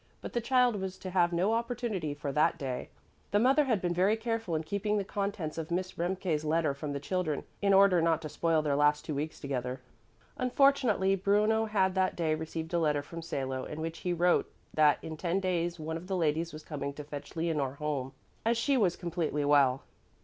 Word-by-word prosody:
But - - -8
the 240 - 0
child 250 -1 +3
was 190 -1 -4
to 185 - -7
have 175 -2 +3
no 180 +6 +1
opportunity 230 - -2
for 145 -1 -4
that 150 +3 +2
day. 130 -3 -4 0.4
The 205 - +2
mother 265 +7 +4
had 225 -8 0
been 175 -1 +1
very 190 +5 +3
careful 225 -6 -2
in 155 - -1
keeping 200 +5 -1
the 200 - 0
contents 195 -6 -3
of 160 - -5
Miss 185 +2 -2
Remke's 175 -3 -1
letter 155 -1 +1
from 145 +1 -5
the 140 - -3
children 155 0 -2 0.2
in 200 -1 +3
order 195 -3 +6
not 165 -1 +2
to - - -3
spoil 165 0 +1
their 145 -2 +1
last 150 +1 +3
two 155 - -3
weeks 150 +3 -4
together. 130 -2 -3 0.6
Unfortunately 250 -7 +3
Bruno 210 +3 +2
had 195 -3 +1
that 185 -1 +1
day 160 -2 0
received 160 +1 -5
a 170 - +3
letter 150 -3 +1
from 165 +3 -8
Salo, 135 -5 -3
in 155 - -7
which 165 +1 -4
he 180 - -2
wrote 175 +1 +2 0.2
that 150 -2 +5
in 160 -1 -6
ten 175 +3 0
days 175 -2 -1
one 160 +1 -3
of 175 +2 -10
the 190 -1 -1
ladies 165 0 0
was 155 0 -9
coming 140 -2 -4
to 150 - -7
fetch 145 +2 -8
Leonore 155 -5 -1
home, 145 -3 -3 0.3
as 230 +1 +2
she 270 +4 +2
was 190 -7 +2
completely 165 -4 -2
well. 140 -2 +4
170 Hz, 210 wpm, -30 LUFS, 150-195 Hz, 0.6 s, order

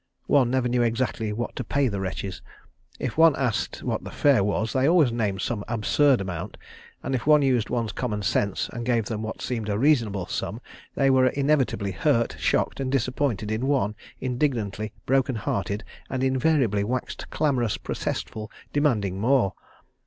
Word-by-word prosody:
One 135 -4 +4
never 130 -1 +1
knew 120 0 +1
exactly 115 -2 0
what 120 +3 -4
to 130 - -3
pay 140 +4 +1
the 100 -4 -2
wretches. 95 0 -4 0.6
If 130 +4 -3
one 165 -3 +7
asked 125 -5 -2
what - - -2
the - - -7
fare 140 -8 +3
was, 105 +2 -1
they 130 +1 +2
always 165 -8 +5
named 105 -5 -1
some 105 -4 -2
absurd 120 +3 +3
amount, 95 +1 -5 0.5
and 135 - -2
if 130 +1 -2
one 150 -1 +6
used 125 -5 +2
one's 115 -3 -1
common 105 -3 -3
sense 100 +1 0
and 120 - -4
gave 115 -2 +1
them 110 -1 -3
what 110 0 -5
seemed 115 -4 -3
a 100 - 0
reasonable 115 - +2
sum 105 +3 -4 0.4
they 135 -1 +3
were 130 -1 +5
inevitably 135 -8 +1
hurt, 115 - +1
shocked, - - 0
disappointed 125 -4 0
in 115 +5 -1
one, 130 -8 +1 0.3
indignantly 115 -6 -1
broken 135 -1 +2
hearted, 100 0 -2 0.3
and 130 0 -2
invariably 130 -6 +2
waxed 125 +4 -4
clamorous, 125 -8 0
protestful, 110 -1 -4 0.2
demanding 110 -11 +1
more. 120 -5 +3
120 Hz, 165 wpm, -25 LUFS, 105-135 Hz, 0.6 s, one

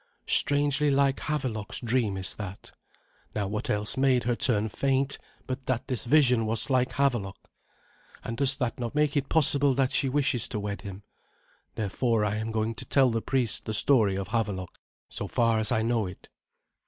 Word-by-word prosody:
Strangely 145 0 +3
like 140 -1 +2
Havelok's 130 -9 -3
dream 115 -5 0
is 95 -1 +1
that. 100 -2 -8 0.6
Now 105 -2 -1
what 105 +2 -4
else 105 +3 -1
made 130 -2 +3
her 120 +1 0
turn 110 -4 +2
faint 135 +4 0 0.3
but 130 0 -6
that 130 -3 -1
this 125 -3 -2
vision 125 -4 +4
was 115 +5 -1
like 125 -1 +1
Havelok? 120 -9 0 0.9
And 115 - -5
does 135 +2 +3
not 125 -3 -2
that 120 +2 -5
make 150 -1 +1
it 140 -1 -1
possible 140 -3 +3
that 135 -1 +1
she 135 - +1
wishes 140 -3 0
to 105 - -4
wed 100 0 -5
him? 100 0 -9 0.7
Therefore 110 +1 0
I 105 0 -1
am 110 +1 -3
going 110 0 -1
to 100 - -10
tell 135 -3 +3
the 115 0 -1
priest 125 -3 -1
the 110 - -2
story 110 -9 +3
of 95 -1 -4
Havelok, 100 -6 -3 0.3
so - - -6
far 115 -1 +1
as 110 - -2
I 110 - +1
know 115 -3 0
it." 90 - -12
120 Hz, 180 wpm, -27 LUFS, 110-135 Hz, 0.9 s, vision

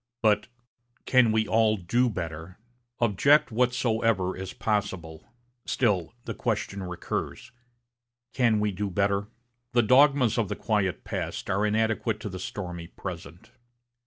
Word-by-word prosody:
but, 105 -1 +3 0.6
'Can 125 -4 +4
we 110 0 +1
all 110 -1 +3
do 120 +8 +1
better?' 85 -3 -6 0.4
Object 120 +8 +4
whatsoever 115 -5 +1
is 95 0 -6
possible, 95 -7 -3 0.4
still 100 -7 0
the - - -4
question 100 0 -2
recurs, 90 +6 -5 0.8
'Can 115 -4 +3
we 105 0 +1
do 100 +1 -3
better?' 100 +2 0 0.5
The 120 -1 +4
dogmas 130 -1 +4
of 105 -5 0
the - - -2
quiet 105 -5 -1
past - - -4
are 100 +3 +1
inadequate 110 0 0
to 105 - -4
the 95 -1 -7
stormy 90 -3 -6
present. 85 -3 -9
105 Hz, 130 wpm, -27 LUFS, 95-115 Hz, 0.8 s, Can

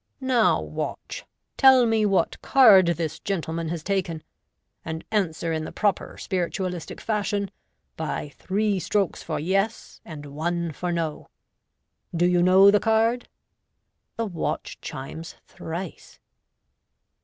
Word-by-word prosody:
Now, 255 -4 +3
watch, - - -5 0.3
tell 265 -2 +7
me 220 -2 +2
what 195 -1 +1
card 215 -9 +7
this 165 -2 -1
gentleman 165 -4 -3
has 165 -1 -4
taken; 180 -5 -2 0.6
and 160 0 -6
answer 170 -5 0
in 160 -1 -2
the - - -6
proper 205 -3 -1
spiritualistic 180 -2 -3
fashion,, 205 -2 -1 0.5
by 155 -2 -3
three 200 +6 -1
strokes 190 +1 -1
for - - -3
'yes,' 195 +7 -1
and 150 -3 -9
one 170 +4 -2
for 175 +4 -3
'no.' 165 -3 -3 0.9
Do 170 +1 +3
you 180 0 +3
know 190 +3 +7
the 205 - +4
card? 225 +3 +1 0.4
" - - -52
The 230 - -1
watch 175 -6 -4
chimes 160 +5 -7
thrice. 170 +2 -8
185 Hz, 125 wpm, -25 LUFS, 165-210 Hz, 0.9 s, tell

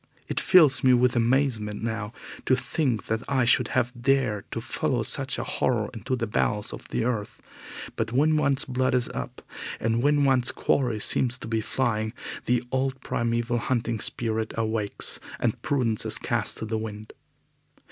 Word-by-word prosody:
It - - -1
fills 165 -8 +6
me 130 -1 +6
with 125 0 +3
amazement 115 -4 +1
now 110 -2 -3 0.4
to 130 - +5
think 125 - -1
that 110 0 -1
I 130 -3 +2
should 120 - +3
have 125 -1 +1
dared 120 -4 0
to - - -4
follow - - -1
such - - -1
a - - -2
horror 115 -4 0
into 120 +3 -2
the 120 -2 -2
bowels 105 -1 -1
of - - -9
the - - -1
earth, 115 -4 -3 0.6
but 110 0 -2
when 150 +5 +3
one's 140 -2 +2
blood 130 0 0
is 125 -1 +1
up, - - -6 0.4
and 115 +1 0
when 145 +1 +3
one's 130 -2 +3
quarry 120 -6 0
seems 125 +4 +3
to 125 - -8
be 110 0 0
flying, 110 -2 -1 0.3
the 125 0 +2
old 130 0 -1
primeval 120 0 -1
hunting 115 -2 -1
spirit 110 0 -2
awakes 110 -2 -1 0.2
and - - -1
prudence 120 -6 0
is - - -1
cast - - 0
to - - -4
the 110 0 -2
wind. 110 0 -7
120 Hz, 170 wpm, -26 LUFS, 110-130 Hz, 0.6 s, fills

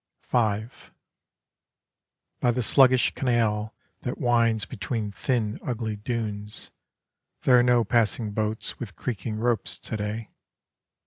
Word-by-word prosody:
V 110 -3 +1 1.7
By 125 - +2
the 120 +1 +1
sluggish 130 +1 +5
canal 110 -4 0 0.2
That 125 - -4
winds 115 -3 +2
between 105 +1 -3
thin 105 +4 -1
ugly 115 -3 -2
dunes, 105 -2 -4 0.7
There 125 -2 +6
are - - +6
no 120 -1 +4
passing 110 0 +1
boats 110 +1 -2
with 100 -8 -7
creaking 110 +3 -3
ropes 115 -1 0
to - - -6
day. 105 +1 -4
110 Hz, 115 wpm, -26 LUFS, 105-120 Hz, 1.7 s, There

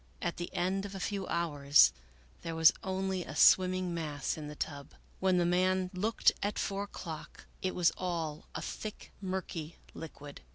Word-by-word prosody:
At - - -2
the 175 - -5
end 190 +2 0
of 200 -1 -6
a - - -5
few 195 0 -2
hours 145 -4 +4 0.5
there 165 -1 -4
was 160 0 +7
only 190 -1 -2
a 155 - -8
swimming 185 +1 +5
mass 150 -4 -2
in 155 -2 -7
the 150 - -7
tub. 145 -2 -5 0.2
When 185 -1 +3
the 175 - +3
man 185 +1 +2
looked 210 +5 +3
at 205 +1 -1
four 200 0 -1
o'clock, 165 -6 -8 0.2
it 185 - -1
was 175 -2 +4
all 165 -4 -3
a 160 - -3
thick 215 +4 -6
murky 185 -4 -4 0.2
liquid. 145 -3 -9
180 Hz, 170 wpm, -32 LUFS, 160-190 Hz, 0.5 s, was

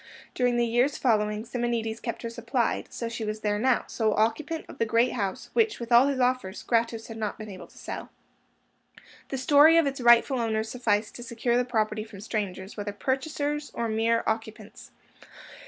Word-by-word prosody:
During 245 -1 +1
the 240 - +3
years 245 +5 +1
following, 210 -3 +1
Simonides 235 -2 -2
kept 235 0 -5
her 230 - -3
supplied; 235 +1 -1
so 235 - -4
she 230 0 -5
was 215 0 -4
there 205 -1 0
now, 255 +1 +2
sole 220 -2 0
occupant 290 +9 0
of - - -12
the 230 - +2
great 230 +3 +3
house, 195 -5 -3
which, 450 -2 +2
with 235 0 -7
all 240 +3 +7
his 275 -2 -1
offers, 250 -6 0
Gratus 230 -1 0
had 225 - -8
not 215 -2 -3
been 215 -1 -8
able 185 - -10
to - - -21
sell. - - -6 1.2
The 270 - -3
story 290 +5 +6
of 330 - +5
its 275 -1 -2
rightful 240 +2 +5
owners 220 -1 -1
sufficed 215 -4 0
to - - -9
secure 235 0 -1
the 250 0 +2
property 215 -3 -1
from 215 -3 -12
strangers, 200 -2 -4
whether 205 -1 -4
purchasers 290 +5 -2
or 235 - -1
mere 225 +1 +1
occupants. 220 -1 -4
230 Hz, 190 wpm, -27 LUFS, 220-250 Hz, 1.2 s, all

